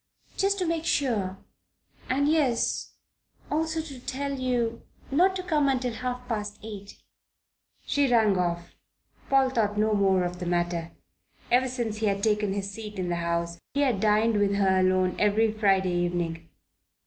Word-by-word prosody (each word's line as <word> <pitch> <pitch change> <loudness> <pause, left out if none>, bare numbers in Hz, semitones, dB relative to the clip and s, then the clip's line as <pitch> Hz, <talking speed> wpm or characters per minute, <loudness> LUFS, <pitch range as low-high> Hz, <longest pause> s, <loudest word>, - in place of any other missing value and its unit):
"Just 395 +1 +1
to 370 - -1
make 330 -1 -1
sure. 215 - 0 0.7
And 280 +2 +2
yes 295 -6 +1 0.6
also 320 +1 0
to 285 -5 -9
tell 280 +3 -3
you 240 -3 -1 0.3
not 365 +7 +3
to 370 - -3
come 295 -7 +2
till 250 -2 -3
half 250 +1 -4
past 210 -3 -3
eight." 205 -2 -9 0.9
She 285 -3 +1
rang 220 -4 +4
off. 175 -1 -2 0.6
Paul 270 -1 +4
thought 210 -4 0
no 215 +1 +2
more 195 -2 +3
of 180 0 -4
the 180 - -4
matter. 175 -1 -1 0.6
Ever 255 +2 +4
since 240 -4 -3
he 220 0 0
had 200 0 -1
taken 210 -2 +1
his 200 0 -3
seat 210 0 -8
in 180 -1 -2
the 175 - -1
House 170 0 -2 0.2
he 285 - +2
had 255 -8 +2
dined 215 +2 +3
with 200 0 +2
her 190 -2 +3
alone 185 0 +2
every 215 +2 +3
Friday 195 -4 +2
evening. 175 -2 -2
215 Hz, 160 wpm, -27 LUFS, 190-255 Hz, 0.9 s, rang